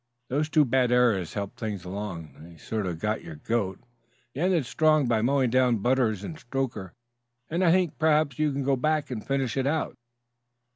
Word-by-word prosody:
"Those 150 +4 0
two 155 -2 +4
bad 125 -1 +2
errors 115 -9 +2
helped 100 -1 -5
things 105 -5 -4
along; 90 -4 -6
they 85 +2 -13
sort 105 +3 -3
of 85 -2 -3
got 105 +6 -2
your 80 - -8
goat. 95 +3 -2 0.5
You 140 - -5
ended 175 -5 +2
strong 155 +2 +3
by 115 -2 +2
mowing 130 0 +2
down 125 -2 +3
Butters 110 -2 +1
and 155 +8 -7
Stoker, 120 - -4 0.6
and 170 +3 +1
I 170 - +5
think 180 -3 +1
perhaps 155 -2 +2
you 155 -1 +2
can 140 0 -2
go 135 +1 +2
back 155 +2 0
and 110 -4 -4
finish 135 -4 -1
it 135 0 +1
out." 155 +2 -1
125 Hz, 190 wpm, -27 LUFS, 105-145 Hz, 0.6 s, I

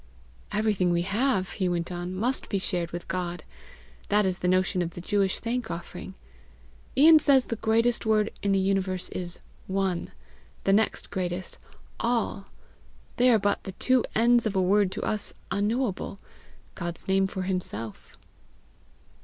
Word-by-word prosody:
"Everything 210 -4 +1
we 170 0 +2
have," 200 0 0
he 185 -3 -1
went 175 0 -2
on, 175 +1 -4
"must 245 +7 -1
be 200 - 0
shared 180 -3 -1
with 175 0 -7
God. 175 -3 -3 0.7
That 210 0 +3
is 185 -1 -1
the 180 - -1
notion 185 0 +2
of 170 -1 -3
the - - -6
Jewish 195 +1 +1
thank 235 0 -2
offering. 175 +2 -7 0.8
Ian 315 +3 +8
says 275 -3 +4
the 230 - -3
greatest 230 +2 +2
word 215 -1 +2
in 200 - +1
the 195 - +3
universe 190 -1 0
is 175 -1 -5 0.3
ONE; 190 -2 -1 0.5
the 195 - +3
next 220 +2 +1
greatest, 180 -1 -3 0.4
ALL. 230 -4 -1 0.7
They 250 +1 +5
are 235 - +6
but 205 -1 0
the 190 - -7
two 255 +5 +2
ends 235 +1 +4
of 205 - -3
a - - +3
word 195 +1 +3
to - - -4
us 210 -1 -2 0.2
unknowable 210 -1 -1 0.6
God's 175 -1 -5
name 195 0 +3
for 190 -1 -4
himself." 145 - -5
195 Hz, 155 wpm, -27 LUFS, 180-220 Hz, 0.8 s, Ian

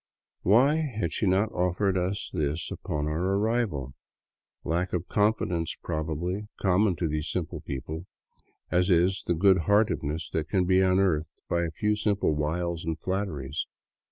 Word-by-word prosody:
Why 130 - +5
had 130 -10 -2
she 105 - 0
not 100 +4 +2
offered 90 +2 +1
us 95 +2 -2
this 75 +1 -2
upon 75 -1 -3
our 90 +6 0
arrival? 105 - 0 0.7
Lack 90 +3 -1
of 90 -1 -1
confi 105 +3 +2
dence, 85 -2 -2
probably, 85 +6 -3
common 95 0 +3
to 85 - -1
these 75 0 -2
simple 85 -2 -3
people 80 +4 -6 0.6
as 90 +3 +2
is 90 +1 +3
the 85 - +2
good 95 +2 +5
hearted 105 +2 +3
ness 75 +3 -3
that 75 -1 -2
can 90 +1 +2
be 95 +1 +4
unearthed 90 -4 +1
by 85 - +1
a - - -2
few 105 0 +2
simple 105 -6 +1
wiles 80 +3 -1
and 80 -1 -2
flatteries. 80 -8 -3
90 Hz, 155 wpm, -27 LUFS, 80-100 Hz, 0.7 s, Why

